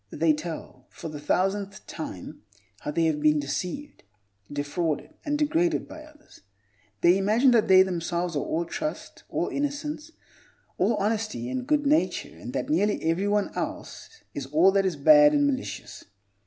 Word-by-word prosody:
They 160 Hz, +5 st, +2 dB
tell, 155 Hz, -5 st, -7 dB
for 165 Hz, -, -8 dB
the 150 Hz, -1 st, -7 dB
thousandth 195 Hz, +6 st, -1 dB
time, 155 Hz, -, -8 dB, 0.4 s
how -, -, -6 dB
they 165 Hz, +2 st, +1 dB
have 155 Hz, -2 st, +1 dB
been 150 Hz, 0 st, +4 dB
deceived, 180 Hz, -, -4 dB, 0.5 s
defrauded, 145 Hz, +2 st, -2 dB
and 295 Hz, 0 st, -1 dB
degraded 325 Hz, +3 st, +1 dB
by 310 Hz, -, -10 dB
others. 305 Hz, 0 st, -18 dB, 0.6 s
They 175 Hz, +3 st, +5 dB
imagine 220 Hz, +7 st, +4 dB
that 230 Hz, -3 st, +3 dB
they 190 Hz, 0 st, +8 dB
themselves 175 Hz, -1 st, -2 dB
are -, -, +1 dB
all 170 Hz, +2 st, -1 dB
trust, 305 Hz, -, -6 dB
all -, -, -1 dB
innocence, 290 Hz, +2 st, -3 dB, 0.7 s
all 230 Hz, -, +3 dB
honesty 210 Hz, -, -2 dB
and 255 Hz, 0 st, -3 dB
good 295 Hz, -1 st, +2 dB
nature, 300 Hz, +3 st, +1 dB
and -, -, -8 dB
that -, -, -2 dB
nearly 210 Hz, -9 st, +1 dB
everyone 200 Hz, +5 st, +1 dB
else 450 Hz, -, -6 dB
is 140 Hz, -2 st, -5 dB
all 160 Hz, +7 st, +4 dB
that 195 Hz, -1 st, +2 dB
is 180 Hz, -, -2 dB
bad 295 Hz, -, +7 dB
and 290 Hz, 0 st, +3 dB
malicious. 275 Hz, -2 st, -4 dB
195 Hz, 155 wpm, -26 LUFS, -, 0.7 s, they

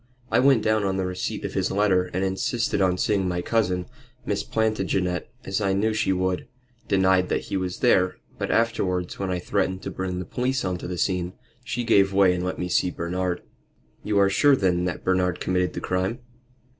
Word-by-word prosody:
I -, -, +4 dB
went 130 Hz, -4 st, +4 dB
down 110 Hz, -1 st, +2 dB
on 95 Hz, -1 st, 0 dB
the 95 Hz, -, 0 dB
receipt 90 Hz, 0 st, -3 dB
of -, -, -4 dB
his -, -, 0 dB
letter, 95 Hz, -2 st, +2 dB
and 90 Hz, +1 st, -3 dB
insisted 95 Hz, +3 st, 0 dB
on 90 Hz, -1 st, +2 dB
seeing 100 Hz, -1 st, +1 dB
my 90 Hz, -1 st, -2 dB
cousin. 90 Hz, -5 st, 0 dB, 0.4 s
Miss -, -, -1 dB
Plantagenet 95 Hz, -5 st, -1 dB, 0.2 s
as 95 Hz, +2 st, -1 dB
I 100 Hz, -2 st, +1 dB
knew 110 Hz, +3 st, +1 dB
she 105 Hz, -, +1 dB
would, 95 Hz, -1 st, -1 dB, 0.4 s
denied 95 Hz, -1 st, +3 dB
that -, -, 0 dB
he -, -, -5 dB
was 90 Hz, -1 st, -3 dB
there; 95 Hz, -7 st, +3 dB, 0.2 s
but -, -, -2 dB
afterwards, 95 Hz, -6 st, 0 dB
when 95 Hz, -1 st, -2 dB
I 90 Hz, -, 0 dB
threatened 95 Hz, +2 st, -1 dB
to -, -, -4 dB
bring 95 Hz, -1 st, -3 dB
the 90 Hz, -, -4 dB
police 125 Hz, +8 st, -1 dB
on 90 Hz, -1 st, -2 dB
to -, -, -6 dB
the 90 Hz, 0 st, -4 dB
scene, 90 Hz, -1 st, -1 dB, 0.3 s
she 120 Hz, 0 st, -3 dB
gave 100 Hz, -4 st, +4 dB
way 95 Hz, -2 st, +5 dB
and 90 Hz, 0 st, -2 dB
let 90 Hz, -, -2 dB
me 90 Hz, -, -2 dB
see 90 Hz, 0 st, +2 dB
Bernard." 90 Hz, +1 st, -3 dB, 0.6 s
"You 105 Hz, -1 st, 0 dB
are 100 Hz, -1 st, +5 dB
sure, 140 Hz, +7 st, +5 dB
then, 90 Hz, -6 st, +1 dB
that 90 Hz, -, -3 dB
Bernard 90 Hz, -1 st, +1 dB
committed 90 Hz, 0 st, 0 dB
the -, -, -5 dB
crime?" 95 Hz, +5 st, -1 dB
95 Hz, 205 wpm, -25 LUFS, 90-105 Hz, 0.6 s, way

